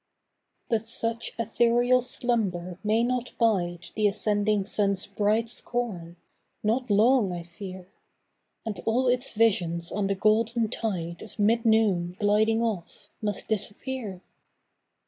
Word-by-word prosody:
But 225 -2 0
such 230 0 -2
ethereal 240 +2 +3
slumber 200 -8 -2
may 220 +2 +2
not 250 0 -1
bide 180 -7 0
The 215 -1 +3
ascending 205 0 +1
sun's 200 -2 0
bright 210 +3 +1
scorn 215 -8 -4 0.5
not 240 +4 0
long, 215 0 +4
I 175 -1 -5
fear; 185 +1 -9 0.8
And 220 -3 -4
all 250 +3 +2
its 250 +1 +2
visions 175 -7 +1
on 200 0 -1
the 195 - 0
golden 220 +3 +2
tide 170 -6 -3
Of 220 - -11
mid 225 +3 +2
noon 195 -6 +2
gliding 215 +2 +3
off, 210 -7 -4
must 210 -2 -2
disappear. 215 -1 -2
215 Hz, 125 wpm, -27 LUFS, 195-230 Hz, 0.8 s, long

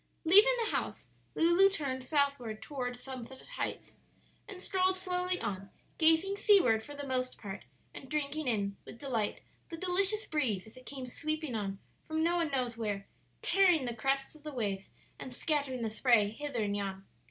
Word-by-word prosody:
Leaving 410 +9 +8
the - - -2
house, - - -3 0.3
Lulu 345 +4 +5
turned 275 -9 -3
southward 275 -6 0
toward 250 -4 -4
Sunset 260 0 -8 0.2
Heights, - - -4 0.5
and 395 -3 -8
strolled 375 0 +1
slowly 365 -1 0
on, 195 0 -4 0.3
gazing 325 +5 +4
seaward 365 - +5
for 290 - -9
the 285 0 -6
most 255 -1 -2
part, 200 -2 -7 0.3
and 265 - -10
drinking 300 0 -2
in 200 -4 0
with - - -11
delight 235 -6 -2 0.3
the 330 - -6
delicious 390 +4 +2
breeze 245 -12 -1
as 220 - -14
it 255 0 -14
came 270 -2 -6
sweeping 310 +2 -3
on 200 -3 -2 0.3
from 315 0 0
no 340 +1 +2
one 335 -2 +1
knows 250 -4 -1
where, 205 -3 -2 0.4
tearing 360 -8 +4
the 240 - -2
crests 270 +4 0
of 310 - -16
the 305 0 -6
waves 200 -7 -3 0.3
and 260 - -7
scattering 280 -4 0
the 225 - 0
spray 220 -3 +3
hither 265 -1 -3
and 205 -1 -1
yon. 195 -1 -4
275 Hz, 175 wpm, -32 LUFS, 230-325 Hz, 0.5 s, Leaving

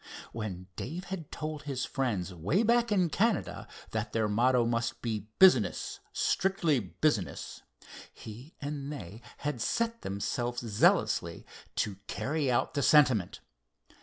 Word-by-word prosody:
When 100 -5 -5
Dave 170 +8 -5
had 175 -5 -6
told 155 0 -4
his 135 -3 -3
friends 105 -9 -2
way 100 - +1
back 235 0 +3
in 185 -5 +2
Canada 225 +1 0 0.2
that 105 -1 -3
their 110 -1 +1
motto 120 +3 +3
must 115 0 -1
be 110 -3 -3
"business, 130 - +4
strictly 175 -7 +1
business," 105 - -2 0.5
he 120 +9 -11
and 145 0 -4
they 105 - -8 0.2
had 145 -5 -3
set 230 - 0
themselves 120 +5 -2
zealously 105 -2 +2 0.3
to 105 - 0
work 95 - -13
to - - -4
carry 145 -1 0
out 125 +1 +1
the 145 - 0
sentiment. 130 - +4
130 Hz, 135 wpm, -30 LUFS, 110-155 Hz, 0.5 s, business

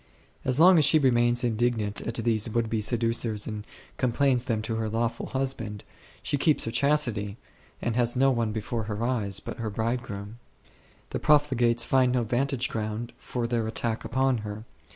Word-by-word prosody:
As 130 +2 +1
long 180 +1 +7
as 150 - +5
she 160 - +6
remains 120 -3 +3
indignant 110 -3 0
at 115 - -4
these 115 -1 +1
would 115 0 -1
be 110 -1 0
seducers 115 -1 0
and 105 -1 -6 0.3
complains 130 0 +2
of - - -8
them 110 -4 0
to 110 0 -2
her 110 -1 -2
law 115 +2 +1
ful 115 - -7
husband, 125 -6 -3 0.4
she 145 - -1
keeps 155 +1 +2
her 115 - -3
chastity 120 -6 +1 0.5
and 120 - -1
has 120 0 +1
no 135 +1 +4
one 115 -3 0
before 110 +1 -3
her 105 +1 -3
eyes 115 -6 +1
but - - -7
her 115 -3 -3
bridegroom; 110 -1 -4 0.7
the - - -2
profligates 120 -5 +3
find 130 -2 +3
no 125 -2 +1
vantage 125 +2 0
ground 110 +1 -4
for 120 -2 -3
their 115 -2 -1
attack 110 0 -2
upon 130 -1 +1
her. 105 0 -6
115 Hz, 180 wpm, -27 LUFS, 110-125 Hz, 0.7 s, long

